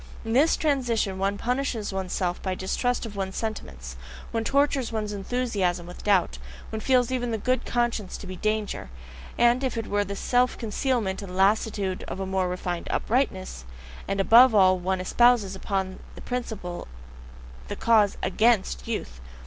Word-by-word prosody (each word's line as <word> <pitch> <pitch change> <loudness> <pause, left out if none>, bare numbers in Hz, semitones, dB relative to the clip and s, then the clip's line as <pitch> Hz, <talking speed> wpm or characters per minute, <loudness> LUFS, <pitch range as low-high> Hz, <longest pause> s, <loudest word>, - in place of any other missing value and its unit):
In 225 - -2
this 290 +6 +4
transition 240 -10 0
one 200 +1 0
punishes 245 -3 -2
oneself 185 -1 -2
by 190 -1 -2
distrust 245 +7 -1
of 215 -2 -8
one's 190 -1 -3
sentiments; 65 - -5 0.3
one 225 -1 -1
tortures 275 -1 +1
one's 215 -2 -3
enthusiasm 200 -5 -1
with 175 +1 -10
doubt, 190 - +2 0.3
one 220 - -3
feels 250 +1 +2
even 245 -2 -1
the 225 - -1
good 255 +4 -1
conscience 240 -5 -1
to - - -10
be 185 - -6
a - - -9
danger, 215 - -2 0.5
as 240 +1 +5
if 255 -3 -1
it 225 - -2
were 205 -1 0
the 200 0 -5
self 250 +4 +1
concealment 225 -3 -1
and 185 -2 -7
lassitude 195 -1 +1
of - - -5
a 195 - -2
more 190 -1 0
refined 180 -1 -4
uprightness; 190 - -1 0.4
and 195 0 -1
above 230 +4 +7
all, 185 -2 +5
one 185 +1 -1
espouses 215 0 +3
upon 190 -1 -3 0.3
principle 220 -8 -4 0.8
the - - -4
cause 215 -3 +3
AGAINST 190 - +2
"youth." - - -4
205 Hz, 160 wpm, -26 LUFS, 190-240 Hz, 0.8 s, above